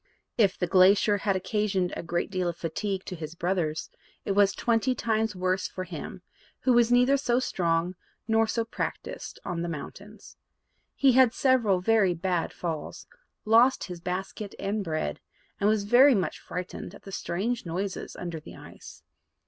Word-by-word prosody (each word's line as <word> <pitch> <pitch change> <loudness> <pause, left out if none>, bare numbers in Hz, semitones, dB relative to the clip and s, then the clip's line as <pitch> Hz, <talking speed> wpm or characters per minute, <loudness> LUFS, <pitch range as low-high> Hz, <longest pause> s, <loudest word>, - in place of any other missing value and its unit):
If 200 -4 +3
the 180 - 0
glacier 195 +3 +5
had 195 -1 0
occasioned 195 -1 -1
a - - -4
great 175 +3 -2
deal 185 -2 -1
of 170 - -6
fatigue 190 +4 -3
to 185 - -5
his 160 -1 -7
brothers, 170 -3 -2 0.3
it - - -1
was 200 0 +4
twenty 240 +2 +1
times 220 -3 0
worse 185 +1 0
for 185 - -6
him, 175 0 -8 0.4
who 255 - +3
was 240 0 +4
neither 250 +3 +5
so 250 -3 +1
strong 175 -6 0 0.3
nor 225 0 +3
so 230 +1 -1
practised 230 - -5
on 170 -1 -3
the 170 - -3
mountains. 200 +7 -9 0.6
He 275 -1 +4
had 255 -1 +5
several 230 -9 +3
very 200 -3 +3
bad 175 0 -1
falls, 160 -4 -5 0.4
lost 235 +4 +5
his 175 -2 -7
basket 190 +3 -5
and 205 +1 -2
bread, 155 - -3 0.4
and 205 - +3
was 215 -1 +2
very 250 +6 +6
much 190 -3 -1
frightened 180 +1 -6
at - - -15
the 195 - -10
strange 205 +7 -2
noises 185 +4 -4
under 170 -2 -5
the 155 - -12
ice. - - -13
195 Hz, 165 wpm, -27 LUFS, 175-225 Hz, 0.6 s, very